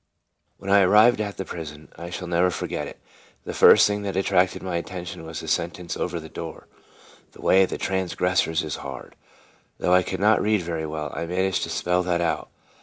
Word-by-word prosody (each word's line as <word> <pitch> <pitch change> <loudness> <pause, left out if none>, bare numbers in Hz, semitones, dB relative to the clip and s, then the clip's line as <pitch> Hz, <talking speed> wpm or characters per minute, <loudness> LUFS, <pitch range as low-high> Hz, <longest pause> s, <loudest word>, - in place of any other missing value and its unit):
When 100 0 -5
I 100 - +7
arrived 105 +4 +5
at 100 -1 -4
the 95 - -4
prison 75 -3 -8
I 85 +2 -8
shall 90 0 -6
never 90 +1 +2
forget - - -4
it - - -11 0.4
the - - -6
first - - +7
thing 105 0 0
that 100 -2 -4
attracted 95 -1 +1
my 90 -2 -2
attention 90 -1 -6
was 80 -1 -6
the - - -9
sentence 85 +1 -2
over 85 -1 -3
the 80 - -10
door: 80 0 -8 0.3
" - - -25
The - - -14
way 95 - +5
of 95 - +1
transgressors 90 -3 0
is 75 -4 -4
hard." - - -9 0.6
Though 90 - +1
I 90 - +6
could - - -4
not 105 +2 +4
read 105 -3 +1
very 80 -2 -3
well, 75 -1 -4
I 85 - -4
managed 95 +2 0
to - - -9
spell 90 +1 0
that 90 -1 0
out. 85 -2 -1
90 Hz, 205 wpm, -24 LUFS, 85-95 Hz, 0.6 s, I